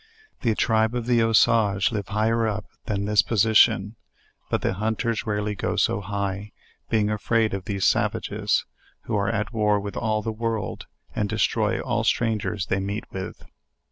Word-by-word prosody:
The 115 Hz, -3 st, +1 dB
tribe 110 Hz, +1 st, +2 dB
of 120 Hz, -2 st, -2 dB
the 120 Hz, 0 st, +2 dB
Usage 115 Hz, -3 st, +3 dB
live 105 Hz, -4 st, -3 dB
higher 110 Hz, +2 st, +1 dB
up 105 Hz, 0 st, -3 dB, 0.2 s
than 100 Hz, -1 st, -1 dB
this 105 Hz, 0 st, +4 dB
po 115 Hz, -, -3 dB
sition; 110 Hz, 0 st, +4 dB, 0.6 s
but -, -, -1 dB
the -, -, +1 dB
hunters 110 Hz, +3 st, -1 dB
rarely 105 Hz, 0 st, -1 dB
go 100 Hz, -, -2 dB
so -, -, +1 dB
high, 100 Hz, +1 st, -3 dB, 0.4 s
being 105 Hz, -2 st, +2 dB
afraid 110 Hz, +1 st, +1 dB
of 95 Hz, -2 st, -4 dB
these 100 Hz, -2 st, -1 dB
savages, -, -, +1 dB, 0.4 s
who 115 Hz, -, -3 dB
are 100 Hz, -1 st, +1 dB
at 105 Hz, +4 st, -2 dB
war 105 Hz, -2 st, +2 dB
with 100 Hz, 0 st, -6 dB
all 110 Hz, -2 st, 0 dB
the 115 Hz, -, -2 dB
world, 115 Hz, -1 st, -3 dB, 0.3 s
and 105 Hz, -1 st, 0 dB
destroy -, -, +1 dB
all -, -, -1 dB
strangers 105 Hz, -4 st, 0 dB
they 95 Hz, -, 0 dB
meet 100 Hz, +2 st, -3 dB
with. 95 Hz, -1 st, -7 dB
105 Hz, 170 wpm, -24 LUFS, 100-115 Hz, 0.6 s, this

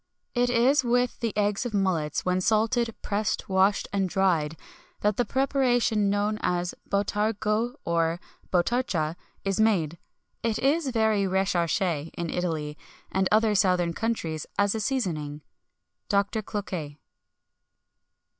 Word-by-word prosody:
"It 245 Hz, 0 st, +2 dB
is 250 Hz, +4 st, +4 dB
with 245 Hz, 0 st, +1 dB
the 230 Hz, -2 st, -1 dB
eggs 205 Hz, 0 st, +1 dB
of 240 Hz, -4 st, -3 dB
mullets, 180 Hz, -6 st, 0 dB
when 185 Hz, 0 st, +1 dB
salted, 225 Hz, +3 st, +1 dB
pressed, 210 Hz, +1 st, -1 dB
washed, 190 Hz, +1 st, +2 dB
and 195 Hz, -2 st, +1 dB
dried, 170 Hz, -5 st, +1 dB, 0.4 s
that 210 Hz, -1 st, +2 dB
the 245 Hz, -, +1 dB
preparation 245 Hz, -4 st, +2 dB
known 205 Hz, +1 st, 0 dB
as 175 Hz, 0 st, 0 dB, 0.2 s
botargo 210 Hz, +3 st, 0 dB
or 165 Hz, 0 st, +1 dB, 0.3 s
botarcha 175 Hz, -5 st, +1 dB, 0.3 s
is 195 Hz, 0 st, 0 dB
made. 170 Hz, -7 st, +2 dB, 0.4 s
It 230 Hz, -2 st, 0 dB
is 290 Hz, +3 st, +1 dB
very 220 Hz, -4 st, +2 dB
recherché 175 Hz, -4 st, 0 dB
in 170 Hz, -2 st, -3 dB
Italy, 155 Hz, -4 st, -2 dB, 0.3 s
and 190 Hz, -1 st, +1 dB
other 215 Hz, 0 st, +4 dB
southern 180 Hz, -4 st, +2 dB
countries, 170 Hz, -9 st, -2 dB
as 200 Hz, 0 st, +3 dB
a 220 Hz, -, -2 dB
seasoning." 165 Hz, -, -2 dB, 0.7 s
DR. 200 Hz, -1 st, +4 dB, 0.2 s
CLOQUET. 180 Hz, -8 st, -5 dB
200 Hz, 125 wpm, -27 LUFS, 175-225 Hz, 0.7 s, is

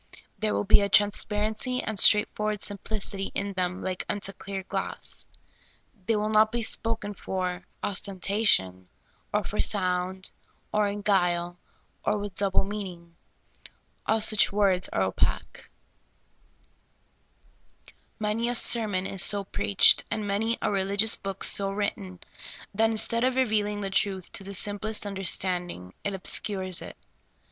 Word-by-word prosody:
There 215 Hz, -1 st, 0 dB
will -, -, 0 dB
be 205 Hz, +1 st, +5 dB
a 200 Hz, -, 0 dB
transparency 210 Hz, +4 st, +1 dB
and 220 Hz, -3 st, -3 dB
straightforward 210 Hz, 0 st, +5 dB
sim 205 Hz, -1 st, -2 dB
plicity 200 Hz, -2 st, -2 dB
in 200 Hz, 0 st, -2 dB
them 180 Hz, 0 st, -2 dB
like 185 Hz, -1 st, -3 dB
unto 200 Hz, -1 st, -3 dB
clear 195 Hz, 0 st, -6 dB
glass. -, -, -5 dB, 0.8 s
The}' 225 Hz, -, +2 dB
will 210 Hz, 0 st, -1 dB
not 215 Hz, 0 st, +4 dB
be 235 Hz, 0 st, -2 dB
spoken 220 Hz, -2 st, -1 dB
for 185 Hz, -1 st, -3 dB, 0.2 s
ostentation, 185 Hz, -, 0 dB, 0.4 s
or -, -, 0 dB
for -, -, -6 dB
sound, 185 Hz, -2 st, 0 dB, 0.4 s
or 210 Hz, -1 st, +2 dB
in 205 Hz, 0 st, -4 dB
guile, 175 Hz, -3 st, +1 dB, 0.4 s
or -, -, +1 dB
with 205 Hz, -1 st, -5 dB
double 195 Hz, 0 st, +1 dB
meaning. 185 Hz, -4 st, -7 dB, 0.9 s
All 220 Hz, 0 st, +2 dB
such 215 Hz, -1 st, +4 dB
words 195 Hz, -3 st, +1 dB
are -, -, 0 dB
opaque. -, -, -2 dB, 2.5 s
Many 215 Hz, +3 st, -1 dB
a 245 Hz, -, -1 dB
sermon 215 Hz, -6 st, +1 dB
is 195 Hz, -1 st, 0 dB
so 200 Hz, 0 st, +4 dB
preached, 205 Hz, 0 st, +4 dB
and 215 Hz, -1 st, -3 dB
many 220 Hz, +4 st, 0 dB
a -, -, +1 dB
relig 200 Hz, 0 st, +1 dB
ious 225 Hz, -, +4 dB
book 195 Hz, -1 st, -6 dB
so 195 Hz, -1 st, +2 dB
written, 195 Hz, -3 st, -4 dB, 0.5 s
that 225 Hz, +2 st, +2 dB
instead 230 Hz, +1 st, +1 dB
of 255 Hz, 0 st, +2 dB
revealing 210 Hz, -5 st, 0 dB
the 195 Hz, -1 st, -4 dB
truth 190 Hz, -2 st, -1 dB
to -, -, -5 dB
the 200 Hz, +1 st, -6 dB
simplest 210 Hz, +2 st, 0 dB
understanding, 180 Hz, -, -1 dB
it 200 Hz, -1 st, -2 dB
obscures 190 Hz, -1 st, 0 dB
it. -, -, -9 dB
200 Hz, 140 wpm, -27 LUFS, 190-215 Hz, 2.5 s, be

